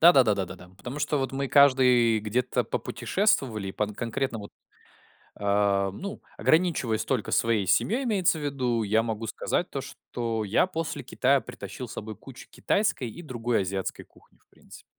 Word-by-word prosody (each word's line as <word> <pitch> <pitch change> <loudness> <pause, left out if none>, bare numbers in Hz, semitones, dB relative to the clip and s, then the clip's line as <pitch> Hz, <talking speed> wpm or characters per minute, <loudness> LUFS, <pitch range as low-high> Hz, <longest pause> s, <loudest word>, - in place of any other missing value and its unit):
Да-да-да, 135 -10 +7
да, 95 -1 -1
да. 90 0 -11
Потому 125 +8 -7
что 145 0 0
вот 135 0 -2
мы 135 0 -2
каждый 125 -5 +5
где-то 115 +4 0
попутешествовали, 125 - 0
по 105 - -1
н 105 0 -7
конкретно 120 +1 -2
вот, 100 -1 -9 0.9
э, 100 -1 +2
ну, 200 - -6 0.2
ограничиваясь 155 -10 +2
только 125 -6 -1
своей 115 -4 +2
семьей, 245 - +2
имеется 190 -8 +2
в - - -7
виду, 125 -5 0
я 110 +2 +2
могу 115 -1 -3
сказать - - -1
то, - - -4
что 115 -2 -4
я 105 - +2
после 165 -3 -4
Китая 135 +1 +2
притащил 120 0 -8
с - - -9
собой 110 0 -6
кучу 130 +3 -12
китайской 200 - 0
и 170 - -10
другой 120 -7 -1
азиатской 95 0 -4
кухни - - -25
в - - -37
принципе. - - -16
120 Hz, 170 wpm, -27 LUFS, 105-140 Hz, 0.9 s, Да-да-да